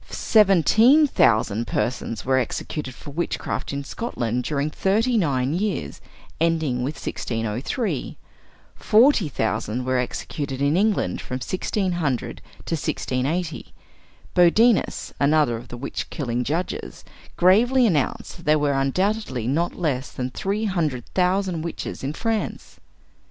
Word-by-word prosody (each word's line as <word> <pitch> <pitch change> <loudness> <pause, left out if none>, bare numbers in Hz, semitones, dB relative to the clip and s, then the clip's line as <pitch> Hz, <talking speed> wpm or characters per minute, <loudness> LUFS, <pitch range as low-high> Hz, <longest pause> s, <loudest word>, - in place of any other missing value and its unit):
Seventeen 220 - +5
thousand 115 - +2
persons 115 -3 -2
were 130 0 +3
executed 130 +2 -4
for 145 - -10
witchcraft 170 +4 -3
in 140 0 -3
Scotland 125 - -3
during 145 +1 -1
thirty 220 +9 +1
nine 140 - +1
years, 180 - -2 0.4
ending 160 -6 +1
with 130 +5 -2
1603. 120 - -3 0.6
Forty 225 - +4
thousand 115 0 -2
were 130 0 +1
executed 135 +2 -4
in 140 +2 +2
England 200 - +1
from 125 - -5
1600 175 - -2 0.3
to - - -3
1680. 155 +2 -2 0.6
Bodinus, 210 +6 +3
another 145 -3 +3
of 120 +2 -8
the 120 - -8
witch 135 +3 -5
killing 125 -4 -2
judges, 165 +8 -4 0.3
gravely 240 +8 +5
announced 160 - -1
that 170 - -14
there 155 0 +5
were 145 -1 +1
undoubtedly 135 - 0
not 160 +8 0
less 145 -7 -2
than 125 -1 -4
three 200 - -2
hundred 155 - -1
thousand 185 -2 +1
witches 165 -3 -5
in 140 +2 -2
France. 225 +4 -3
155 Hz, 125 wpm, -23 LUFS, 130-190 Hz, 0.6 s, Seventeen